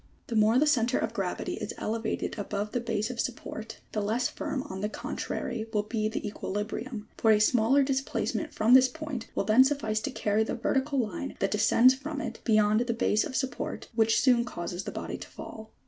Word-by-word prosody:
The 230 - -4
more 215 +2 +4
the 295 - +4
centre 245 -6 +2
of 225 - -2
gravity 195 -5 -3
is - - -4
elevated 220 0 -2
above 205 +1 -3
the 245 - 0
base 225 -1 -2
of 240 - -8
support, 225 -2 -5
the 215 - -1
less 225 +5 0
firm 265 - -3
on 190 -5 -7
the 210 - -1
contrary 225 +1 -4
will 210 -2 +1
be 215 0 -1
the 220 - -4
equilibrium, 210 +3 -4
fbi 220 -1 +5
a - - +2
smaller 240 +5 +4
displacement 270 0 -1
from 225 +3 +3
this 260 0 +8
point 255 -3 -6
will - - +1
then 225 +4 +6
suffice 235 -6 0
to 215 - -3
carry 210 +1 +1
the - - -3
vertical 270 +4 0
line, 220 -7 -2
that 195 - 0
descends 225 +4 +5
from 285 +3 -5
it, - - -5
beyond 215 -1 +4
the 235 -1 0
base 215 -2 +2
of 260 - -5
support 265 -2 -3
which 225 -1 +3
soon 245 -3 +4
causes 175 -5 -5
the - - -4
body - - -5
to - - -8
fall. 220 0 -10
225 Hz, 205 wpm, -28 LUFS, 215-255 Hz, -, this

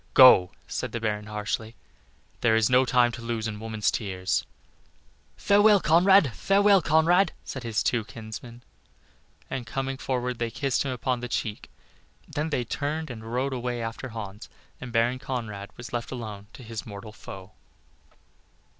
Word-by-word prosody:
"Go," 125 -9 +8 0.2
said - - -4
the 120 - -2
Baron, 105 -1 -2
harshly, 110 +1 -3 0.6
"there 110 -2 +3
is 110 +1 +3
no 130 +1 +5
time 125 -1 +3
to 120 - -8
lose 115 -1 -2
in 105 -1 -5
woman's 110 -1 -1
tears." 95 -4 -2 0.9
"Farewell, 205 0 +5
Conrad! 175 - +5
farewell, 200 0 +4
Conrad!" 165 +5 +3
said 130 - -6
his 115 -3 -1
two 120 -3 +1
kinsmen, 115 +2 -9 0.8
and 130 -3 -5
coming 135 +1 -3
forward 125 -1 -2
they 120 -1 -1
kissed 125 +2 -1
him 135 - -1
upon 125 0 -1
the 125 - -4
cheek 105 -2 -3 0.6
then 150 +2 -2
they 125 -5 0
turned 150 +5 -3
and 110 -1 -8
rode 130 +3 -1
away 125 -1 -3
after 115 +3 -5
Hans, 105 -2 -8 0.3
and 125 -1 -7
Baron 120 +2 +2
Conrad 110 -7 -5
was 120 +1 -9
left 120 -1 -3
alone 105 -5 -7
to 130 - -11
face 115 - -13
his 110 -3 -5
mortal 105 +1 -8
foe. 95 -3 -10
120 Hz, 160 wpm, -26 LUFS, 110-135 Hz, 0.9 s, Go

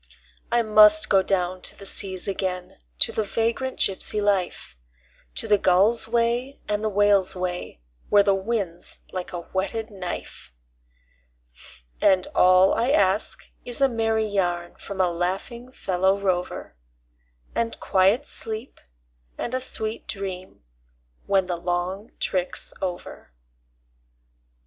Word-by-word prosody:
I 235 0 +3
must 215 0 +6
go 195 - +5
down 185 -1 -1
to - - +4
the 200 - -11
seas 190 -1 -1
again, 185 - -3 0.2
to - - +2
the - - -1
vagrant 230 +5 -1
gypsy 195 +2 +1
life, 200 - -1 0.6
To - - -3
the 205 -1 +4
gull's 195 +7 +3
way 240 +4 0
and 210 0 -1
the 215 - +1
whale's 205 -2 +3
way, 180 - -4 0.3
where 205 -1 +6
the 200 -1 +3
wind's 195 -3 -3
like 185 -1 -5
a 175 - -5
whetted 200 +6 -3
knife; 180 - -7 1.5
And 185 -1 +4
all 185 +1 +5
I 235 +3 +1
ask 200 -5 +1 0.2
is 245 +1 -5
a 275 - +5
merry 225 -2 0
yarn 175 -4 -1
from 200 -1 -8
a 180 -2 +3
laughing 195 +8 -3
fellow 190 -4 +1
rover, 180 - -2 0.8
And 230 0 -2
quiet 195 +9 +3
sleep 225 +1 -6 0.6
and 240 - -4
a 255 - 0
sweet 220 -3 -2
dream 185 - -6 0.6
when 195 -1 +3
the 180 -1 -3
long 180 +4 -3
trick's 185 -2 -2
over. 180 - -6
195 Hz, 130 wpm, -24 LUFS, 185-220 Hz, 1.5 s, must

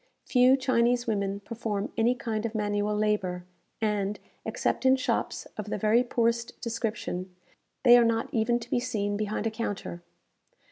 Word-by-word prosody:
Few 255 +1 +5
Chinese 245 -2 +2
women 200 -2 -1
perform 220 +1 -4
any 235 +2 +3
kind 220 -3 -3
of 230 -1 -3
manual 205 0 0
labour; 195 -4 0 0.3
and, 210 -2 -1 0.3
except - - -1
in 260 0 +6
shops 265 - -1
of 210 0 -4
the - - -1
very 215 +4 +3
poorest 235 -1 0
description, 215 -6 -3 0.5
they 240 -2 +9
are - - +5
not 230 0 +1
even 230 +2 +2
to 235 - -9
be - - +2
seen 210 -5 -1
behind 210 +1 -2
a 225 - +1
counter. 205 -6 -4
220 Hz, 155 wpm, -28 LUFS, 205-235 Hz, 0.5 s, they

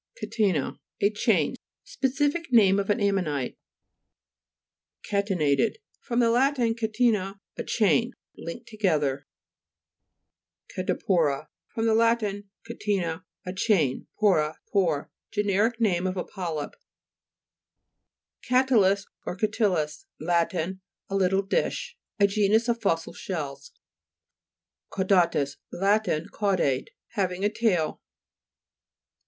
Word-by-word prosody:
CATE'NA 195 - +1
Lat. - - -8 0.2
A 200 +1 +4
chain. 210 - +1 0.3
Specific 290 -3 -1
name 200 -5 +6
of 195 - -2
an 205 - +2
ammonite 180 -10 0 1.5
(p. 205 - -5
152). 190 -3 +2
CA'TENATED - - -21 0.2
fr. 240 - -5
lat. 245 +4 +3
catena, 225 -4 0 0.2
a - - -4
chain. 230 +2 +2 0.2
Linked 225 +8 -8
together. 150 -10 0 1.5
CATEXIPO'RA 165 -5 0 0.2
fr. 225 - -5
lat. 230 +1 +3 0.4
catena, 195 -7 -2 0.2
a 180 - -4
chain, 185 - +1
pora, 160 -7 +3 0.2
pore. 165 -7 +1 0.2
Generic 210 +3 +1
name 185 -5 +2
of 185 0 -3
a 180 - -1
polyp 165 -6 -4 1.7
(p. 250 - -2
31). 260 +1 +6 0.3
CA'TYIUS 200 0 -12 0.2
or - - -2
CATILLUS 185 -8 0
Lat. 170 +2 +1
A 185 +3 -2 0.4
little 195 0 +2
dish. 335 - -1 0.2
A 200 - +6
genus 210 +3 +2
of 235 -1 0
fossil 165 -6 0
shells 140 -6 -5 1.3
(p. 190 - +2
74). - - -6
CAUDA'TUS 170 -7 +2 0.2
Lat. 205 +4 +2 0.3
Caudate; 185 -11 0 0.2
having 185 -1 -1
a - - +4
tail. 210 -8 0
195 Hz, 110 wpm, -26 LUFS, 170-225 Hz, 1.7 s, name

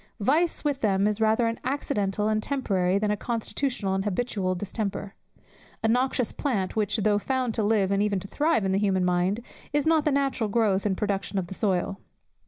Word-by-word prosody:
Vice 305 +11 +1
with 285 -2 -1
them 195 -2 +2
is 210 +1 0
rather 220 +2 +3
an 230 0 -1
accidental 210 -7 -1
and 215 0 +1
temporary, 195 -9 0
than 210 +1 0
a - - +2
constitutional 230 -1 -2
and 190 0 0
habitual 200 -2 -1
distemper; 200 +1 -4 0.7
a - - +3
noxious 250 +1 +1
plant, 210 -10 -2
which, 210 0 +1
though 210 -1 +2
found 255 0 -1
to 220 - 0
live 205 -2 +2
and 200 0 +2
even 205 -2 +1
to 195 - -8
thrive 295 -2 +1
in 190 - +1
the 195 - +2
human 190 -3 +1
mind, 180 +5 +1 0.3
is 290 -1 +2
not 320 -1 +3
the 300 - +2
natural 270 -5 0
growth 205 -2 +2
and 190 -2 -1
production 200 -1 -2
of 190 - 0
the 175 - -8
soil. 195 -1 0
210 Hz, 195 wpm, -26 LUFS, 195-245 Hz, 0.7 s, rather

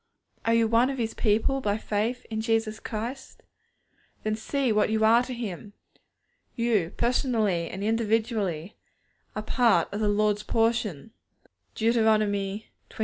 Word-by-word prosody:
Are 230 0 +3
you 230 -1 +3
one 230 +3 +3
of 270 - -3
His 225 -2 -2
people 225 +5 +1
by 205 -3 0
faith 220 +3 -2
in 220 0 -2
Jesus 225 -1 0
Christ? 235 +4 -6 0.8
Then 215 0 0
see 260 +3 -1
what 210 0 +2
you 220 0 +2
are 230 +2 +6
to 250 - -6
Him. 210 -4 -6 0.8
You, 220 -8 +1
personally 220 - +1
and 195 - -6
individually, 220 -5 -1 0.6
are 215 - -3
part 220 -7 +2
of 205 - -3
the 215 -1 +1
Lord's 210 0 +1
portion 225 -6 0 0.6
(Deut. 225 +1 +2
xxxii. 215 -2 +1
220 Hz, 140 wpm, -26 LUFS, 210-230 Hz, 0.8 s, are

